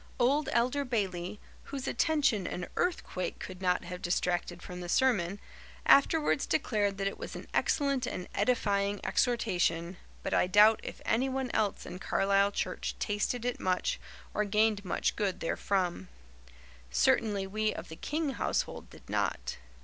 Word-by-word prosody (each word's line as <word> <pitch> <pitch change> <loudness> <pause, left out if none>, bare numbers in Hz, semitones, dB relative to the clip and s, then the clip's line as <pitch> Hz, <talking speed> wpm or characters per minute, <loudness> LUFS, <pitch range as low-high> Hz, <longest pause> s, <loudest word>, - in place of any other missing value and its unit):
Old 275 +4 +2
Elder 255 +4 +2
Bayley, 200 -5 -2 0.3
whose 275 -2 -5
attention 275 - +2
an 180 - -4
earthquake 185 - -1
could 185 0 -8
not 180 -1 +1
have 180 +1 -7
distracted 175 0 -1
from 180 0 -7
the 175 - -6
sermon, 205 -6 +2 0.5
afterwards 295 +1 +4
declared 205 -8 +1
that 195 - -2
it 195 - -2
was - - -6
an - - -7
excellent 275 -4 +1
and 180 - -4
edifying 205 -2 +1
exhortation, 180 -7 +1 0.3
but - - -2
I - - +3
doubt 210 +3 +6
if - - -8
anyone 260 +2 0
else 210 -2 0
in 180 - -7
Carlisle 200 +1 +2
church - - -2
tasted 220 +3 -1
it 245 0 -1
much 185 - 0 0.3
or 210 - +1
gained 210 0 +2
much 180 - 0
good 200 -3 -1
therefrom. 175 - -1 0.8
Certainly 195 - +2
we 215 +2 0
of - - -7
the 160 - -7
King 300 - -2
household 260 - -2
did - - -16
not. - - -1
205 Hz, 150 wpm, -31 LUFS, 180-245 Hz, 0.8 s, doubt